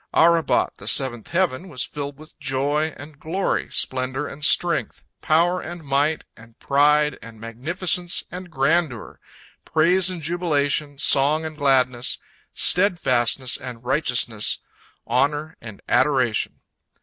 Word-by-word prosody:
'Arabot, 165 0 +3
the - - -10
seventh 125 -5 +2
heaven, 180 -1 -1
was 130 -6 -1
filled 145 -1 -6
with 155 +1 -15
joy 145 +3 -1
and 145 0 -12
glory, 185 +5 -2
splendor 130 +2 -2
and 150 +2 -10
strength, 170 +2 +1 0.2
power 175 +3 +2
and 175 0 -8
might 145 +2 0
and 115 0 -18
pride 150 +1 +2
and 115 -1 -13
magnificence 170 - 0
and 180 +1 -8
grandeur, 145 -4 -1 0.4
praise 175 +4 +3
and 175 -4 -6
jubilation, 150 -4 -1
song 145 +4 +3
and 155 0 -6
gladness, 130 -4 +1 0.4
steadfastness 135 - +3
and 125 -2 -10
righteousness, 125 -6 +1 0.5
honor 145 +6 -1
and 110 -4 -11
adoration. 125 -3 +1
145 Hz, 120 wpm, -22 LUFS, 130-165 Hz, 0.5 s, Arabot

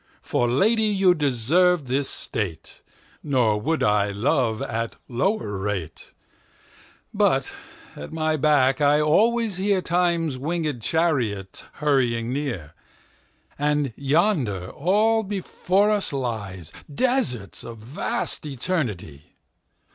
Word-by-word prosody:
For 120 - 0
Lady 215 - +3
you 195 -3 +4
deserve 155 +4 +2
this 135 +2 -1
State; 95 -7 -4 0.4
Nor 120 -7 +1
would 160 +6 0
I 105 -1 +2
love 110 +2 0
at 115 0 -3
lower 125 - -1
rate. 95 -5 -5 1.0
But - - +1 0.4
at 75 - -8
my 155 -1 0
back 145 -1 +2
I 145 +1 +4
alwaies 210 +6 +2
hearTimes 175 -6 +1
winged 150 -2 -2
Charriot 120 - -1
hurrying 125 -5 0
near:And 140 - -5
yonder 140 - 0
all 215 +8 +2
before 200 0 0
us 205 -2 +2
lyeDesarts 120 - -3
of 115 -1 -8
vast 115 +7 -1
Eternity. 120 - -4
140 Hz, 95 wpm, -23 LUFS, 115-175 Hz, 1.0 s, you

